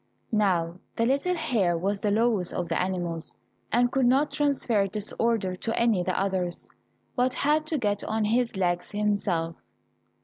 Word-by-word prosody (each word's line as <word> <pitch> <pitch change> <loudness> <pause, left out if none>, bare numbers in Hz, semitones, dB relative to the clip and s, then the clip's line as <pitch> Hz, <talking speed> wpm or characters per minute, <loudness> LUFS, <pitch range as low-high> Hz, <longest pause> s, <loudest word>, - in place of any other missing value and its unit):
Now 180 -5 +1 0.2
the 230 - +1
little 280 +8 +1
hare 230 - +1
was 195 +3 -1
the 210 - +1
lowest 215 -3 +1
of 175 - -2
the 165 - +1
animals, 175 -3 -3 0.4
and 245 0 +3
could 265 -2 +2
not 275 +4 +3
transfer 260 -8 +1
this 210 +1 -5
order 225 -5 +1
to 225 +4 -2
any 230 -5 +3
the 180 0 -1
others, 190 -3 -2 0.5
but 255 0 +1
had 305 +2 +1
to 310 - 0
get 205 -5 -1
on 220 0 0
his 230 0 +1
legs 175 -2 0
himself. 200 -6 -1
210 Hz, 165 wpm, -27 LUFS, 185-245 Hz, 0.5 s, and